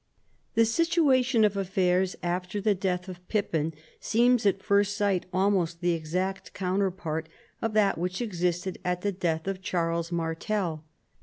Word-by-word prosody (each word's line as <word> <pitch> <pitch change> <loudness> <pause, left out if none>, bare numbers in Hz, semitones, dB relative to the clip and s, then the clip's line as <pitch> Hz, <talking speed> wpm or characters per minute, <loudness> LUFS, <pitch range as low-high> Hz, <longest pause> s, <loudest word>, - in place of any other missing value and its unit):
The 230 - +5
situation 265 -4 +3
of 205 -1 +1
affairs 185 -1 +1
after 180 +3 -2
the 205 +1 +2
death 180 -1 -2
of 180 -1 -10
Pippin 165 -7 0 0.3
seems 240 -1 +3
at 195 0 +1
first 200 0 +2
sight 200 -4 +1
almost 185 -3 +1
the 175 0 +1
exact 180 +4 -3
counterpart 180 -4 -1 0.3
of 225 -1 -1
that 210 -2 +3
wliich 180 +2 -2
existed 180 -4 -1
at 180 -1 -1
the 205 - 0
death 170 -4 -1
of 195 -1 -3
Charles 170 -2 -1
Martel. 165 0 -2
185 Hz, 145 wpm, -28 LUFS, 175-205 Hz, 0.3 s, The